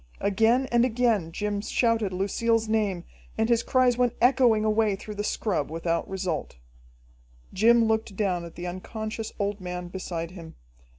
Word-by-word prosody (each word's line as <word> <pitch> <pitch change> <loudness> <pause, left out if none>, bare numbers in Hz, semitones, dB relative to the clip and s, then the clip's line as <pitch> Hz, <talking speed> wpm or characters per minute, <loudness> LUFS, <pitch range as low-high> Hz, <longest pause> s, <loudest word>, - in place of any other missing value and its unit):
Again 225 +6 +2
and 240 0 +4
again 230 -8 +1
Jim 205 +3 -2
shouted 225 -2 +1
Lucille's 220 +4 0
name, 210 -5 0 0.3
and 220 +1 +1
his 235 -1 +3
cries 250 -1 +2
went 245 -1 +2
echoing 245 -4 +4
away 215 -1 +2
through 210 +2 -8
the 205 0 -4
scrub 185 -9 -1
without 165 +1 -2
result. 185 - -3 1.0
Jim 230 +4 +5
looked 220 -2 -1
down 185 -4 0
at 170 - -10
the 175 - -6
unconscious 215 +5 -5
old 200 -1 -2
man 180 -1 -5
beside 175 -2 -5
him. 165 -3 -11
210 Hz, 155 wpm, -26 LUFS, 185-230 Hz, 1.0 s, Jim